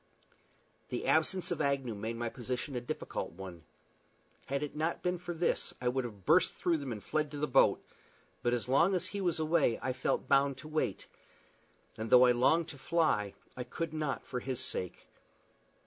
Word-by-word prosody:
The - - -3
absence 175 +3 +2
of 170 - -1
Agnew 140 -4 0
made 110 +3 -4
my 120 0 -2
position 125 +3 -4
a 125 - -1
difficult 120 - -4
one. 90 -2 -9 0.9
Had 140 +1 -1
it 150 - -5
not 160 +2 -1
been 180 0 0
for 175 0 -5
this 170 0 -1
I 125 - +1
would 130 0 -1
have 105 -6 -9
burst 185 - +4
through 170 -2 +1
them 140 -4 -5
and 105 -3 -6
fled 155 -1 0
to 145 - -7
the 145 - 0
boat; 135 0 +4 0.6
but 120 - +1
as 120 -1 -1
long 165 +9 +4
as 180 - 0
he 200 - -4
was 175 -4 0
away 155 -6 +2
I 130 - -2
felt 130 - -1
bound 140 -1 +3
to 145 +3 -10
wait; 155 0 -1 0.9
and 110 0 -3
though 125 0 +8
I 125 - +6
longed 160 +7 +3
to 140 - -9
fly, 130 - +1 0.2
I 125 - -4
could 155 +6 -4
not 155 -3 -2
for 125 - -3
his 130 0 -4
sake. 90 -7 -4
140 Hz, 195 wpm, -32 LUFS, 120-160 Hz, 0.9 s, though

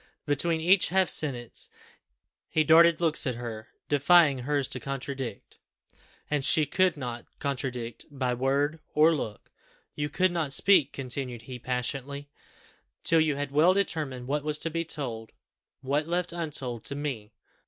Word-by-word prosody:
Between 160 +3 +1
each 180 +3 +4
half 190 0 +3
sentence 125 -6 -1 0.8
he 155 - +2
darted 165 +1 +6
looks 160 -4 +1
at 125 - -1
her, 115 -2 -7 0.2
defying 145 -1 +5
hers 140 +1 -1
to - - -3
contradict 135 -4 -6 0.7
and 150 -2 -1
she 155 +2 +4
could 180 +2 +1
not 120 -3 -6
contradict 125 -4 -4
by 130 -4 -2
word 140 +5 0 0.2
or 155 +2 +6
look. 110 -9 -5 0.4
"You 145 0 -3
could 185 +3 +2
not 160 -5 -1
speak," 170 -7 +4
continued 125 -3 -4
he 125 0 -8
passionately, 135 +3 -3 0.7
"till 165 -1 +4
you 155 -2 +1
had 145 -1 -4
well 160 +6 +4
determined 150 -10 -1
what 145 +2 -1
was 150 0 0
to 165 - -1
be 165 +1 -1
told 125 -9 -4 0.5
what 145 +3 -1
left 175 +1 -1
untold 135 -9 -4
to 140 - -4
me! 125 -8 -5
145 Hz, 150 wpm, -28 LUFS, 125-160 Hz, 0.8 s, darted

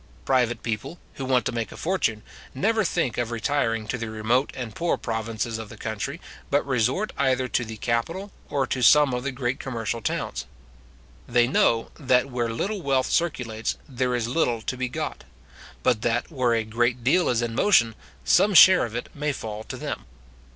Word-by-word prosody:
Private 125 -2 +1
people, 115 +9 -4 0.2
who 135 - -5
want 130 -1 +2
to - - 0
make 115 -2 -3
a - - -10
fortune, 160 - -1 0.3
never 220 +9 +2
think 165 - -1
of 120 -1 -1
retiring 115 -2 0
to 125 - -2
the 115 0 -4
remote 110 +5 +1
and 120 -4 -5
poor 170 +7 0
provinces 110 0 -3
of 110 -2 -7
the 110 - -11
country, 110 - -4 0.3
but 145 +1 +2
resort 135 - 0
either 130 -1 +2
to 120 - +1
the 110 -1 -7
capital, 165 - -2 0.2
or 140 -2 +1
to 130 +1 -2
some 145 +1 +6
of 125 0 -2
the 140 - -2
great 130 +1 -2
commercial 115 -3 -3
towns. - - -3 0.8
They 120 0 +4
know, 115 -2 +2
that 130 -1 +2
where 120 -1 -1
little 195 - -2
wealth 135 -4 +1
circulates, 125 -10 -1
there 125 -2 -1
is 120 -2 -1
little 120 -4 0
to 130 - -2
be 125 0 -2
got; - - -4 0.6
but 120 -4 +2
that 120 +4 0
where 125 -5 +1
a 115 - +1
great 120 +2 0
deal 175 +8 +3
is 120 -1 +1
in 115 -1 -2
motion, 120 - +4 0.3
some 205 -1 +4
share 185 -2 +9
of 115 -1 -7
it 120 - -3
may 150 0 -1
fall 110 -5 -6
to - - -6
them. - - -5
125 Hz, 190 wpm, -25 LUFS, 115-140 Hz, 0.8 s, share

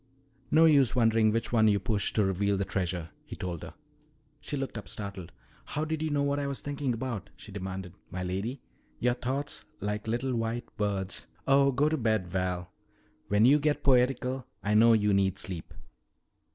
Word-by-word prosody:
"No 160 +3 +6
use 140 -5 +5
wondering 115 -2 +4
which 115 +2 -1
one 110 -2 +5
you 100 -1 +4
push 110 -4 -1
to 105 - +3
reveal 100 +1 +1
the 100 - -1
treasure," 90 -4 -2
he - - -9
told 90 -3 -4
her. - - -9 0.6
She 145 - -4
looked 135 -2 -4
up 105 - -6
startled. 100 -4 -6 0.3
"How 150 +1 -3
did 160 0 -2
you 160 - 0
know 145 -1 +1
what 140 0 +1
I 140 - -1
was 140 -1 -2
thinking 145 -2 -2
about?" 115 -3 -4
she 110 - -12
demanded. 95 -2 -5 0.2
"My 90 0 -4
lady, 100 +8 -3 0.3
your 125 0 +2
thoughts, 135 +3 -3 0.2
like 105 +2 -3
little 120 +3 -1
white 115 0 -2
birds 100 -2 -2
" - - -33
"Oh, 140 0 +5
go 140 +4 +2
to 155 +1 +1
bed, 110 -6 +1
Val. 90 0 -2 0.6
When 105 +2 +4
you 145 +4 +6
get 150 0 0
poetical 130 -1 +2 0.2
I 105 - +1
know 115 +2 +7
you 105 -2 +3
need 95 -1 +2
sleep. 90 -4 -4
110 Hz, 190 wpm, -29 LUFS, 100-135 Hz, 0.6 s, know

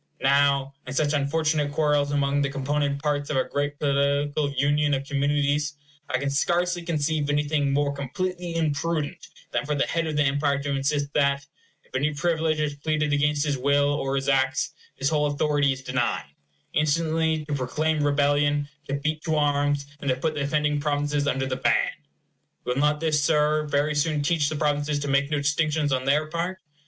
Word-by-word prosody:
Now, 140 0 +3
in 130 - -5
such 150 0 +1
unfortunate 150 0 +1
quarrels 145 -1 +2
among 145 0 +1
the 140 - 0
component 140 +1 -1
parts 145 -1 -1
of 145 - 0
a 130 - +3
great 145 0 -2
political 140 +1 +1
union 145 +1 +2
of 135 +1 -4
communities, 145 +1 0 0.3
I 130 - +1
can 140 +1 -2
scarcely 175 +5 +1
conceive 155 -3 -1
anything 145 -1 +1
more 140 0 +1
completely 175 +5 -4
imprudent 160 -1 -1 0.2
than - - 0
for 150 +1 -2
the 140 - +1
head 165 -1 -1
of 155 - -3
the 150 - +4
empire 140 0 +1
to 145 - -2
insist 140 +1 -1
that, 140 -1 +1 0.4
if - - -30
any 145 +3 0
privilege 160 0 0
is 150 -1 0
pleaded 155 +1 -1
against 145 0 +1
his 140 -3 -1
will 140 +2 +3
or 135 -1 -1
his 135 0 -2
acts, 135 -1 +1 0.2
his 135 +1 0
whole 150 -1 +2
authority 145 -1 +1
is 135 0 -5
denied; 125 - -2 0.4
instantly 160 +1 +1
to 150 - -4
proclaim 150 +4 0
rebellion, 145 0 +2 0.2
to 140 - -1
beat 155 +2 -2
to 160 -2 +1
arms, 145 -1 +1
and 140 - -3
to 130 - +3
put 155 +5 -1
the 150 - -3
offending 150 +1 +1
provinces 145 0 0
under 135 -1 0
the 130 -1 -2
ban. - - +2 0.7
Will 125 - -1
not 150 +2 +1
this, 155 -2 +1
Sir, 150 0 +2
very 145 +1 +1
soon 150 0 0
teach 150 -1 +1
the 155 - -3
provinces 145 0 0
to 145 0 -3
make 140 0 +2
no 150 - 0
distinctions 150 0 +1
on 130 0 -1
their 145 +3 +2
part? 170 +4 -3
145 Hz, 185 wpm, -25 LUFS, 140-150 Hz, 0.7 s, the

